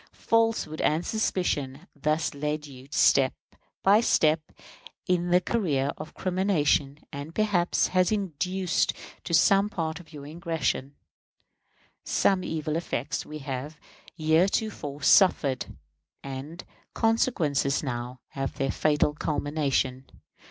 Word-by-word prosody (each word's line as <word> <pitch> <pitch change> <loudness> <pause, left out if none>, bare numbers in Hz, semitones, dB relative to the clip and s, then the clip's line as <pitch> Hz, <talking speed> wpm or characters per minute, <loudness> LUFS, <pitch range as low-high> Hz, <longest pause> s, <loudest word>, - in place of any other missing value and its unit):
Falsehood 225 -9 0
and 160 +3 +1
suspicion 180 -11 -1
have 160 +7 -17
thus 155 +3 0
led 150 +1 -3
you 130 -2 -12
on 140 - -23
step 135 -2 +4 0.5
by 205 +3 +6
step 155 -8 +3 0.6
in 175 -2 +1
the 180 +1 +5
career 155 - 0
of 155 - -9
crimination, 175 -7 +1 0.2
and 145 +3 -7
perhaps 205 -5 +2
has 185 +1 +2
induced 185 -2 0 0.3
to - - -7
some 195 +4 +4
part 165 -4 -3
of 175 - -15
your 145 -3 -9
aggression. 150 -3 -2 1.1
Such 195 -1 +2
evil 155 -3 -2
effects 145 -4 -3
we 155 - -6
have 135 +3 -5 0.4
heretofore 160 -2 0
suffered, 145 -7 +4 0.6
and 140 +4 -7
the - - -23 0.3
consequences 165 - +1
now 125 -1 -5
have 135 -2 -4
their 135 -1 0
fatal 150 -1 +2
culmination. 145 -4 -1
155 Hz, 120 wpm, -27 LUFS, 140-185 Hz, 1.1 s, by